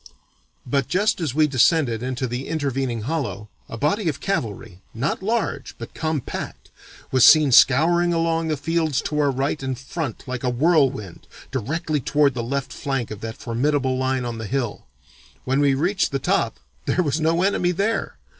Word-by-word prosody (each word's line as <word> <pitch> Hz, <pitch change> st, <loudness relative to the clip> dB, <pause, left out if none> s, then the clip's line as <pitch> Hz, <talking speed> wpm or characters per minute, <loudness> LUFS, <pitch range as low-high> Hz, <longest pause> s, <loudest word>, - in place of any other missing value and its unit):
But 140 Hz, +2 st, 0 dB
just 205 Hz, +1 st, +1 dB
as 145 Hz, -6 st, -2 dB
we 155 Hz, 0 st, +5 dB
descended 135 Hz, -3 st, +2 dB
into 130 Hz, 0 st, -2 dB
the 125 Hz, +2 st, -4 dB
intervening 135 Hz, -6 st, -2 dB
hollow, 105 Hz, -, -3 dB, 0.2 s
a 115 Hz, -, -6 dB
body 160 Hz, -, +1 dB
of 140 Hz, -, -4 dB
cavalry, 110 Hz, -, -3 dB
not 135 Hz, +11 st, -1 dB
large 200 Hz, -, -2 dB
but 115 Hz, -, -9 dB
compact, 155 Hz, -4 st, -4 dB, 0.4 s
was 130 Hz, -2 st, +4 dB
seen 155 Hz, -3 st, +7 dB
scouring 170 Hz, +8 st, +5 dB
along 165 Hz, -1 st, 0 dB
the 155 Hz, -2 st, -1 dB
fields 160 Hz, -3 st, 0 dB
to 150 Hz, -, -2 dB
our 145 Hz, -1 st, +3 dB
right 135 Hz, +2 st, -1 dB
and 130 Hz, -1 st, -3 dB
front 135 Hz, -1 st, -5 dB
like 130 Hz, +1 st, -4 dB
a 125 Hz, -, +1 dB
whirlwind 135 Hz, -, +1 dB, 0.2 s
directly 155 Hz, +5 st, -2 dB
toward 145 Hz, +2 st, +2 dB
the 120 Hz, -, -3 dB
left 140 Hz, +3 st, -3 dB
flank 135 Hz, -5 st, -3 dB
of 105 Hz, -1 st, -7 dB
that 115 Hz, 0 st, -6 dB
formidable 130 Hz, +2 st, 0 dB
line 130 Hz, -1 st, -1 dB
on 120 Hz, -1 st, -4 dB
the 110 Hz, -, -5 dB
hill. 120 Hz, -, -3 dB, 0.6 s
When 135 Hz, +2 st, +1 dB
we 140 Hz, -2 st, +3 dB
reached 180 Hz, +8 st, 0 dB
the 140 Hz, -, 0 dB
top 135 Hz, -, 0 dB, 0.3 s
there 180 Hz, -, +2 dB
was 155 Hz, 0 st, -1 dB
no 165 Hz, +3 st, +2 dB
enemy 185 Hz, -2 st, +2 dB
there! 200 Hz, +6 st, -1 dB
140 Hz, 175 wpm, -22 LUFS, 125-160 Hz, 0.6 s, seen